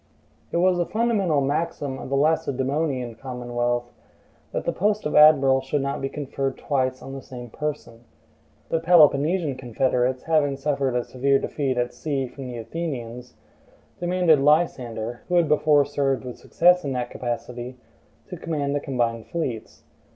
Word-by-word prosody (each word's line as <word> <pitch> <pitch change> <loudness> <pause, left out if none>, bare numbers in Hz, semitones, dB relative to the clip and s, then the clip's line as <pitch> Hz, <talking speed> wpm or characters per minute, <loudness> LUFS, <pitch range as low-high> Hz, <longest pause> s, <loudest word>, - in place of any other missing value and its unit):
It - - 0
was 180 0 +3
a 175 - +1
fundamental 210 -10 +1
maxim 145 -1 -2
of - - -7
the 140 - 0
Lacedaemonian 135 -3 0
commonwealth, 120 -1 -3 0.6
that - - -3
the - - +1
post 210 +2 0
of 150 - -1
admiral 140 -3 +6
should 135 +1 -1
not 140 0 -3
be 135 - -2
conferred 135 -2 -3
twice 130 -3 -1
on 135 - -8
the 135 - -6
same 120 -3 -10
person. 150 -6 -5 0.7
The 165 - +1
Peloponnesian 160 -2 +4
confederates, 125 +1 0
having 150 -4 +1
suffered 140 -2 -1
a 120 - +1
severe 135 +3 +1
defeat 135 -2 -2
at 120 0 -1
sea 135 +2 -2
from 130 +1 -9
the 125 -1 -6
Athenians, 125 -3 -6 0.6
demanded 175 -3 +3
Lysander, 125 -6 +1
who 180 - 0
had 170 -2 +4
before 150 -1 +4
served 135 -2 -1
with 125 - -8
success 180 +1 +3
in 140 -2 -2
that 125 -1 -3
capacity, 120 +1 -5 0.5
to 180 - -6
command 150 -4 -2
the 145 - 0
combined 120 -5 -2
fleets. 130 -10 -5
135 Hz, 155 wpm, -24 LUFS, 125-155 Hz, 0.7 s, admiral